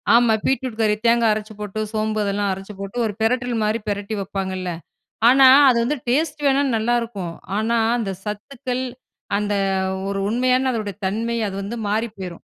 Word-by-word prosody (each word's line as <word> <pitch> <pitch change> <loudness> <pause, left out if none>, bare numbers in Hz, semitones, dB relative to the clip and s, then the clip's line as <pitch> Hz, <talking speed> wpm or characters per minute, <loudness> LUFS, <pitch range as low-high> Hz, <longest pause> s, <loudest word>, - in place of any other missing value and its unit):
ஆமா. 235 -1 +5
பீட்ரூட் 260 -4 -1
கறி 210 -1 +3
தேங்கா 235 0 +4
அரச்சு 215 0 -5
போட்டு, 210 0 -5
சோம்பு 215 0 -1
அதெல்லாம் 200 0 0
அரைச்சி 195 +2 -6
போட்டு, 195 +4 -6
ஒரு 215 - -2
பெரட்டல் 245 +2 +1
மாரி 215 +2 +1
பிரட்டி 205 +1 -2
வப்பாங்கல்ல. 190 -1 -3 0.6
ஆனா, 265 +1 +7 0.2
அது 245 - +3
வந்து 290 +6 0
டேஸ்ட் 295 +3 0
வேணா 275 0 +3
நல்லாயிருக்கும். 225 -6 -1 0.2
ஆனா, 225 +2 +1 0.2
அந்த 215 -5 -2
சத்துக்கள் 245 +4 -4 0.5
அந்த 205 0 -1 0.6
ஒரு 200 0 -2
உண்மையான 255 +3 +2
அதனுடைய 215 -5 -3
தன்மை 230 +4 -1
அது 195 - -5
வந்து 200 +4 -5
மாறி 220 +3 0
போயிரும். 180 -3 -7
220 Hz, 160 wpm, -21 LUFS, 205-245 Hz, 0.6 s, ஆனா